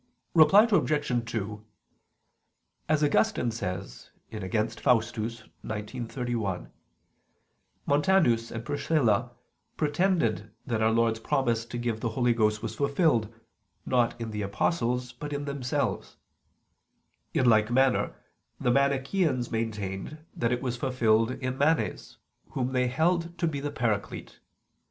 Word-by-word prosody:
Reply 170 +6 +7
Obj. 145 - +1
2: 105 -1 -4 1.3
As 155 -1 +2
Augustine 150 - +2
says 90 -5 -6 0.2
(Contra 110 0 -1
Faust. 120 -3 +1
xix, 115 0 -4 0.7
31), 115 -8 -3 1.1
Montanus 145 -6 +3
and 115 0 -6
Priscilla 125 -5 +1 0.5
pretended 145 - +1 0.2
that 115 -3 -1
Our 110 - +4
Lord's 115 0 +2
promise 115 -1 0
to 120 - -5
give 120 -2 -2
the 115 - -1
Holy 120 +1 +2
Ghost 110 -2 +1
was - - -3
fulfilled, 140 - +1 0.5
not 120 -2 +1
in 115 -1 -4
the 105 -1 -3
apostles, 125 - -1
but 145 +4 -7
in 145 0 -3
themselves. 140 -3 -2 1.2
In 130 - +3
like 110 -1 +4
manner 130 +1 +2 0.4
the 125 - +1
Manicheans 140 0 +1
maintained 110 +3 -3 0.2
that 115 0 0
it 125 +1 -1
was 125 -1 -2
fulfilled 115 -3 +2
in 130 0 -4
Manes 155 +3 0 0.4
whom 130 -1 -1
they 125 -1 +2
held 170 +5 0
to 170 - 0
be 155 -4 -1
the 145 +1 -3
Paraclete. 115 -7 -3
120 Hz, 125 wpm, -28 LUFS, 110-145 Hz, 1.3 s, Reply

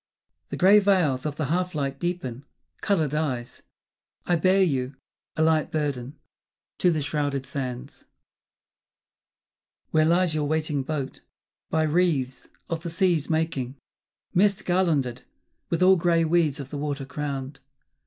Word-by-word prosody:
The - - -4
grey 195 +3 +7
veils 175 -10 +2
of 145 - -4
the 155 - -2
half 180 +4 -1
light 140 -2 -2
deepen; 145 -8 -3 0.4
colour 185 -7 +2
dies. 135 -5 -3 0.6
I 175 - +2
bear 185 +3 +4
you, 135 -5 -1 0.4
a 160 - +2
light 160 -1 +2
burden, 145 -2 -3 0.6
to 180 - +4
the 160 -3 +1
shrouded 145 -2 -1
sands, 130 -1 -6 1.8
Where 155 0 +4
lies 170 +1 +3
your 155 -1 0
waiting 155 -2 0
boat, 140 -1 -4 0.5
by 160 0 +1
wreaths 150 -5 0 0.2
of 165 -1 -3
the 170 - -5
sea's 165 -3 +1
making 155 -5 -1 0.6
Mist 200 +2 +2
garlanded, 155 -9 +1 0.5
with 170 +2 +1
all 190 +1 +6
grey 165 -1 +2
weeds 160 -3 +2
of 140 -1 -7
the 145 - -4
water 145 -2 -3
crowned. 135 0 -5
155 Hz, 135 wpm, -25 LUFS, 140-175 Hz, 1.8 s, grey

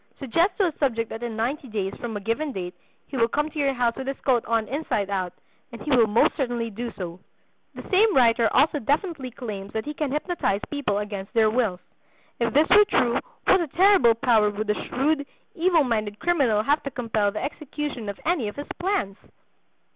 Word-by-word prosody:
Suggest 330 - +1
to 400 - +3
a 345 - +1
subject 230 -5 0
that 225 - -6
in 235 -2 -4
ninety 260 +5 -2
days 200 -4 -3
from 230 -3 -5
a - - -7
given 255 +9 -1
date 180 -6 -5 0.3
he 270 - -6
will 230 -1 +4
come 295 +5 -1
to 305 - -6
your 275 -2 +1
house 240 -1 +1
with 265 - -6
his 275 - -3
coat 250 -4 +2
on 225 -2 0
inside 230 -7 -2
out, 185 -2 -1 0.4
and 235 - -9
he 300 - -4
will 240 -4 +5
most 210 +2 +3
certainly 240 -5 -2
do 235 +3 -5
so." 175 -1 -6 0.6
The - - -9
same 405 +2 +4
writer 230 -2 +4
also 295 +2 +3
definitely 290 - -1
claims 210 -6 -7
that 220 - -3
he 300 - -4
can 300 -2 -2
hypnotize 300 - -1
people 280 -9 -1
against 205 -1 -5
their 220 -2 +4
wills. 215 -7 0 0.6
If 235 -1 +1
this 300 +5 +4
were 420 +1 +7
true, 245 - +2 0.3
what 380 - +5
a 335 - -2
terrible 355 - +5
power 225 -4 +3
would 210 +1 -2
a 210 - -3
shrewd, 285 +2 0 0.3
evil 340 -2 +3
minded 215 -5 -1
criminal 275 -11 +2
have 290 +6 +2
to 275 - -4
compel 225 -5 0
the 215 - -4
execution 290 -6 -5
of 200 - -6
any 315 -9 +1
of 205 - -6
his 285 - -6
plans! 350 - -1
245 Hz, 205 wpm, -25 LUFS, 215-295 Hz, 0.6 s, were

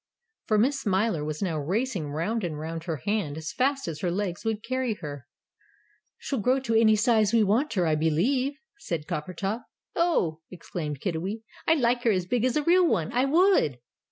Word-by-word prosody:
For 215 - +3
Miss 270 +6 +2
Smiler 195 - +1
was 155 +3 -3
now 165 -5 -1
racing 185 - -1
round 185 +10 -2
and 160 -4 -3
round 160 +2 -5
her 165 -3 -2
hand 200 -8 -1
as 160 0 -5
fast 270 -1 0
as 160 -2 -4
her 180 - -1
legs 180 -1 -2
would 220 -1 -2
carry 255 -1 -1
her. 145 -7 -8 0.9
"She'll 275 - -3
grow 255 +6 +2
to 235 -3 -2
any 220 -1 +5
size 215 -1 +3
we 230 -2 +5
want 230 +10 +1
her, 185 -5 +1
I 160 - +2
believe," 210 - +1 0.2
said 170 - -4
Coppertop. 185 +9 -3 0.3
"Ough!" 240 - +1
exclaimed 155 -5 -6
Kiddiwee; 190 +5 -3 0.2
"I'd 320 -3 +4
like 240 +1 +2
her 235 - +3
as 185 -3 0
big 240 +5 0
as 255 +3 +1
a 300 - +1
real 355 +3 +5
one, 165 - 0
I 250 +2 +3
would!" 320 - +3
210 Hz, 190 wpm, -27 LUFS, 165-250 Hz, 0.9 s, any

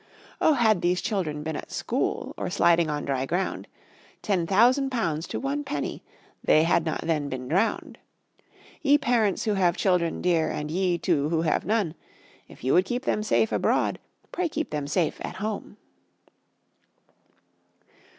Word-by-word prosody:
Oh, 315 - +5
had 220 -7 +3
these 180 +1 +1
children 155 -8 -2
been 160 0 -3
at - - -7
school, - - -2
Or - - -4
sliding 170 -1 +3
on 150 -1 -2
dry 135 -1 -1
ground, 180 +5 -2 0.6
Ten 185 -6 0
thousand 250 +8 +4
pounds 165 - -2
to - - -4
one 280 +2 -2
penny 145 - -4 0.4
They 155 - +5
had 165 0 +2
not 160 - -2
then 150 -4 -1
been 130 -1 -5
drowned. 190 - -1 0.8
Ye 290 -1 +5
parents 230 -8 +1
who 215 - +1
have 180 -3 +2
children 180 -4 +1
dear, 170 -3 +1
And 150 0 -4
ye, 180 0 +1
too, 155 -5 0
who 165 0 +1
have 155 - 0
none, 205 -7 +1 0.5
If - - -16
you 130 - +2
would 180 +2 +4
keep 245 +6 -3
them 210 - +1
safe 215 +1 +1
abroad, - - +1 0.3
Pray 355 -1 -1
keep 315 +1 -3
them 145 -2 -3
safe 160 +2 -1
at - - -5
home. 210 +2 -5
180 Hz, 160 wpm, -26 LUFS, 155-220 Hz, 0.8 s, Oh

